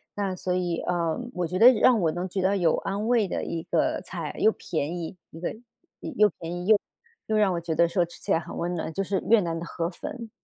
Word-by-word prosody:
那 195 -2 -1
所 180 0 -2
以 175 -2 -1
呃， 170 -2 -1
我 180 -1 -1
觉 180 +3 -3
得 245 +3 +10
让 240 0 +4
我 160 - +2
能 175 +3 -3
觉 190 +1 -2
得 195 +2 +2
有 170 -3 +3
安 200 +3 -2
慰 235 -4 +3
的 - - -3
一 165 - -3
个 170 0 0
菜， 170 -4 -6
又 220 - +5
便 160 +1 -3
宜 170 +1 -5
一 165 - -11
个， 175 - -3 0.5
又 210 -8 +2
便 165 0 -5
宜 175 0 -5
又 215 0 +5 0.5
又 215 0 +1
让 200 -3 +3
我 170 - -1
觉 165 -1 -2
得 170 +2 +4
说 175 +1 +2
吃 170 - -14
起 - - -4
来 - - +4
很 - - -8
温 175 +1 -2
暖， 160 -1 -3
就 195 - -1
是 195 0 -1
越 230 - +7
南 165 -2 -2
的 170 - -6
河 170 0 -3
粉。 230 +5 -7
180 Hz, 270 characters per minute, -26 LUFS, 170-200 Hz, 0.5 s, 得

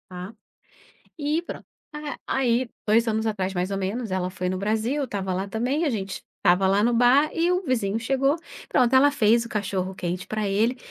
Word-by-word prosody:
Tá. 180 +3 -7 0.9
E 300 +3 0
pronto, 345 - -8 0.3
a 300 -1 -5
aí 250 -2 +1 0.2
2 225 +2 +4
anos 220 0 0
atrás 195 -3 -2
mais 180 +1 -2
ou 195 - -1
menos 205 +5 -3
ela 185 -1 -1
foi 180 0 -4
no 185 +1 -1
Brasil, 220 +6 0
eu - - 0
estava 195 -7 -3
lá 190 +2 -3
também, 250 +9 -1
a 315 - +2
gente 195 -6 -4
estava 185 0 +3
lá 195 +2 +3
no 240 +3 +2
bar 250 +6 +5
e 340 +2 +1
o 360 +1 +1
vizinho 225 -6 0
chegou, 270 +5 +1 0.3
pronto 250 +1 +3
ela 285 +2 +6
fez 230 -2 +3
o 235 - -9
cachorro-quente 185 -3 -3
pra 215 -1 -2
ele, 220 +6 +1
220 Hz, 200 wpm, -25 LUFS, 190-255 Hz, 0.9 s, ela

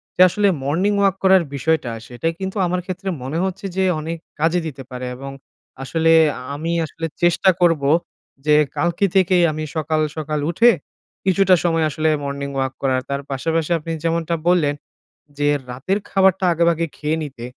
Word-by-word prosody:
যে - - +2
আসলে 205 +3 +1 0.2
morning 180 +9 +1
walk 195 -2 +3
করার 190 -2 +5
বিষয়টা 140 -3 0 0.2
সেটা 120 +6 -4
কিন্তু 190 +2 -4
আমার 180 +1 -1
ক্ষেত্রে 190 +1 -4
মনে 140 +5 -3
হচ্ছে 190 +1 -4
যে 190 - +1 0.2
অনেক 165 +2 -4 0.2
কাজে 165 +3 +2
দিতে 135 -3 -8
পারে। 125 -1 -6
এবং 135 +2 -7 0.5
আসলে 165 +3 +1 0.3
আ - - -9
আমি 165 +3 -3
আসলে 165 +2 -6 0.2
চেষ্টা 175 +2 +4
করব 165 -5 +3 0.6
যে 150 0 +5 0.2
কালকে 175 +3 +1
থেকেই 185 -2 +4
আমি 155 0 -4
সকাল, 155 0 0 0.2
সকাল 150 0 -2
উঠে 230 +8 +5 0.6
কিছুটা 190 0 +4
সময় 165 -2 +2
আসলে 155 +2 0
morning 140 0 -4
walk 130 0 -1
করার। 130 -1 +1
তার 140 0 -2
পাশাপাশি 160 +4 -1
আপনি 165 +2 -6
যেমনটা 165 0 0
বললেন 155 -5 +2 0.6
যে 145 0 +2 0.2
রাতের 150 +11 -1
খাবারটা 190 -1 +3
আগেভাগে 170 0 +2
খেয়ে 155 +1 -1
নিতে। 130 -5 -8
165 Hz, 165 wpm, -20 LUFS, 145-180 Hz, 0.6 s, করার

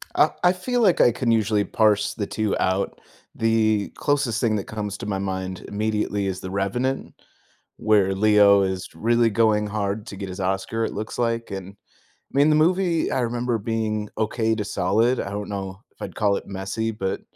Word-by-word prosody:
I - - +5
I 180 0 +5
feel 245 +6 -1
like 190 -6 +4
I 120 - +6
can 120 0 0
usually 105 -2 +2
parse 105 -1 +2
the 100 -3 -4
two 110 -2 -1
out. 95 +1 0 0.4
The 110 -2 +2
closest 140 -6 0
thing 115 -3 +2
that 100 - -4
comes 105 -2 -4
to - - -7
my 100 -2 -2
mind, 95 -1 -4
immediately, 105 -1 -1
is 95 -1 -3
The 95 - -7
Revenant, 120 +8 -2 0.6
where 100 -3 +3
Leo 100 0 +5
is 95 -1 -2
really 120 +1 +2
going 105 -1 +2
hard 105 +1 -3
to 100 - -8
get 95 0 -5
his 90 +2 -7
Oscar, 95 +4 -1
it - - -3
looks 110 +3 -5
like 115 -1 -1
and, 95 0 -6 0.6
I - - -6
mean, 145 +2 +5
the 155 - +4
movie, 170 +1 +2
I - - +1
remember 120 0 -1
being 110 -1 -2
okay 110 +1 0
to 105 - -2
solid. 110 +6 +1
I 95 - -4
don't 100 0 -4
know 95 0 -5
if - - -15
I'd - - -6
call 100 -2 +2
it - - -6
messy, 100 +3 -3
but 95 -3 -3
105 Hz, 195 wpm, -23 LUFS, 100-115 Hz, 0.6 s, I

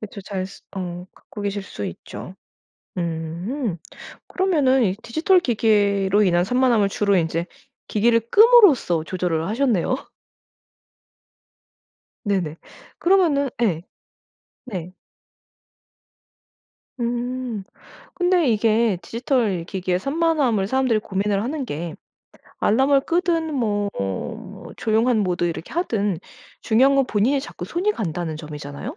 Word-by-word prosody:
그쵸 205 -1 -8
잘 190 -1 -4 0.3
어 180 -1 -5
갖고 205 - -10
계실 200 0 -2
수 100 - -7
있죠. 85 - -8 0.6
음 170 - -3 0.5
그러면은 290 -9 +2
이 190 -2 +1
디지털 325 +10 +3
기기로 205 - +2
인한 175 -2 +3
산만함을 240 -2 +2
주로 200 0 +1
인제 165 0 0 0.4
기기를 230 +2 +3
끔으로써 405 - +6
조절을 170 -2 -2
하셨네요. 240 -1 +1 2.3
네네. 180 -6 -1 0.4
그러면은 335 -7 +3
예. 175 -7 +1 0.8
네. 185 -6 -6 2.1
음 240 -2 -3 0.5
근데 355 -5 +2
이게 220 -2 +2
디지털 225 -2 -1
기기의 185 0 -2
산만함을 275 - +1
사람들이 255 -2 +2
고민을 200 -1 -1
하는 280 +2 -3
게 165 -6 -5 0.7
알람을 270 +5 +4
끄든 330 -2 0
뭐 205 -5 0 0.7
뭐 - - -10
조용한 225 +1 +2
모드 180 -3 0
이렇게 165 -1 -4
하든 210 - 0 0.4
중요한 260 +5 +4
건 275 -1 +4
본인이 245 +7 +1
자꾸 270 - -8
손이 370 +5 0
간다는 170 - -3
점이잖아요. 150 -2 -7
215 Hz, 240 characters per minute, -22 LUFS, 185-265 Hz, 2.3 s, 끔으로써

